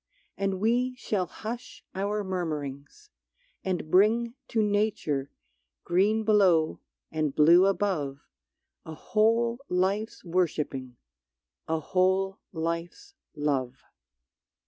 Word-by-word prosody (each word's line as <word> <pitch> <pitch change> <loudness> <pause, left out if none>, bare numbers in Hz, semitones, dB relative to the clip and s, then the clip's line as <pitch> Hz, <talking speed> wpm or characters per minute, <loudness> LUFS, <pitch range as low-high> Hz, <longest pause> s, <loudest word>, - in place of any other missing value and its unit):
And 195 -1 -1
we 245 +4 +1
shall 200 -6 -2
hush 235 +7 -7
our 205 +2 -1
murmurings, 160 - -5 0.5
and 180 -4 -3
bring 230 +5 +4
To 220 -2 +1
Nature, 205 -10 0 0.5
green 205 +5 +2
below 190 -7 +3 0.3
and 155 -3 -1
blue 170 +5 +6
above, 180 -9 -1 0.6
A 160 - -8
whole 230 +5 +1
life's 195 +4 -1
worshipping, 150 -8 -1 0.7
a 160 0 0
whole 190 +4 +1
life's 170 - -4 0.2
love. 135 -4 -2
185 Hz, 95 wpm, -28 LUFS, 155-215 Hz, 0.7 s, blue